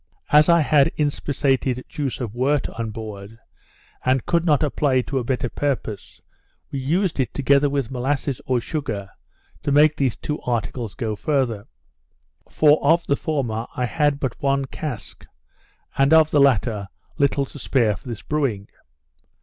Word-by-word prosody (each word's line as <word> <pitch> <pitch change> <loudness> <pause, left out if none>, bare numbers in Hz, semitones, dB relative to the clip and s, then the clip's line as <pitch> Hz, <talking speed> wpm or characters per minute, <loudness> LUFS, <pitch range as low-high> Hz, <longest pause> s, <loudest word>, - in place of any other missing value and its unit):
As 150 +2 +6
I 170 -1 +6
had 145 -2 +4
inspissated 135 -3 0
juice 140 -4 -4
of 115 -5 -4
wort 135 +4 +1
on 115 -1 -5
board, 110 -1 -8 0.7
and 130 -1 +1
could 170 -1 +1
not 150 -3 +3
apply 145 -2 +1
it 130 - +2
to 135 - 0
a - - -3
better 125 0 -1
purpose, 120 -7 -3 0.5
we 140 - -3
used 165 +6 0
it 130 - 0
together 140 +1 +3
with 140 -4 -2
molasses 135 +1 -2
or 125 -1 +2
sugar, 110 -8 -4 0.5
to 145 - -1
make 150 +2 +5
these 135 -6 0
two 150 - -4
articles 120 -2 -3
go 110 -2 -3
farther. 120 -5 -1 0.8
For 150 0 +4
of 165 +4 +3
the 140 - +2
former 120 -8 -2
I 125 - 0
had 145 +3 +1
but 130 -4 -4
one 140 0 +1
cask, 130 -4 -7 0.7
and 135 +3 +3
of 155 -1 +5
the 145 - +4
latter 110 -6 +2 0.3
little 140 0 +2
to 145 - -12
spare 115 -5 +1
for 95 - -14
this 115 -3 -6
brewing. 130 -10 -2
135 Hz, 160 wpm, -22 LUFS, 120-145 Hz, 0.8 s, As